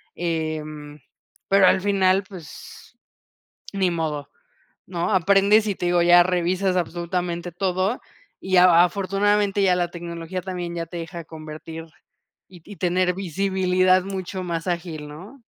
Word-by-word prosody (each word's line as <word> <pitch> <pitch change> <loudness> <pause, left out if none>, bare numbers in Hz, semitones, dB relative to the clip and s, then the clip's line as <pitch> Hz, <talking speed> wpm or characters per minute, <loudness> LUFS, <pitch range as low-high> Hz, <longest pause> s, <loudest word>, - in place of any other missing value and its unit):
em, 155 -3 -4 0.5
pero 195 -1 +5
al 190 - +3
final, 195 -1 +2
pues, 170 -5 -12 0.8
ni 190 -2 +1
modo, 155 -4 -3 0.6
¿no?, 175 -2 -3
aprendes 200 +3 +4
y 200 - -1
te 175 - -3
digo, 175 0 +3
ya 175 +1 +7
revisas 185 +1 0
absolutamente 175 0 -3
todo 185 +5 -1 0.4
y 185 -1 0
a 175 -1 +7
afortunadamente 200 +2 +1
ya 185 -2 +4
la 175 -1 -1
tecnología 170 +1 -6
también 180 -2 -5
ya 170 -1 -3
te 175 +2 -8
deja 165 0 -7
convertir 160 +1 -9 0.6
y 180 -2 -15
y 205 -1 -11
tener 180 0 +1
visibilidad 185 0 +1
mucho 190 -1 -5
más 170 0 -4
ágil, 170 -4 -4
¿no? 190 - -12
180 Hz, 135 wpm, -23 LUFS, 170-190 Hz, 0.8 s, ya